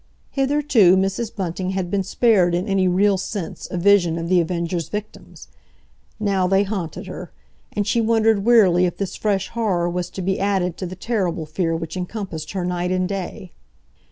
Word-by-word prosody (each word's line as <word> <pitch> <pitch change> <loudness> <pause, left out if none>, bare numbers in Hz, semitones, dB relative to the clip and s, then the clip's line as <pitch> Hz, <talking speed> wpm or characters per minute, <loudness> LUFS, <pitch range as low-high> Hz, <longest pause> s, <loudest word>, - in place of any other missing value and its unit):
Hitherto 270 -9 +3
Mrs. 195 +4 -1
Bunting 185 -1 -3
had 180 -2 -2
been 200 - +1
spared 190 -3 +3
in 180 +4 -2
any 195 -2 +2
real 190 +2 +3
sense 190 -2 -5
a 180 - -4
vision 175 -3 +4
of 165 0 -4
The 180 -1 +4
Avenger's 170 0 -2
victims. 210 +1 -8 0.7
Now 195 -3 +1
they 195 +2 +3
haunted 190 -6 -4
her, - - -8 0.4
and 205 - -1
she 230 +3 +1
wondered 220 -2 +2
wearily 195 -6 +5
if 175 - -5
this 195 -2 -3
fresh 200 -3 -1
horror 200 -7 0
was 175 0 -2
to 190 - -6
be 190 +1 0
added 190 -3 0
to 185 - -4
the 185 - -7
terrible 185 -6 -2
fear 165 +1 -1
which 165 +1 -5
encompassed 180 -4 -5
her 185 -2 -2
night 180 0 -1
and 185 0 0
day. 190 0 -5
190 Hz, 180 wpm, -21 LUFS, 175-205 Hz, 0.7 s, wearily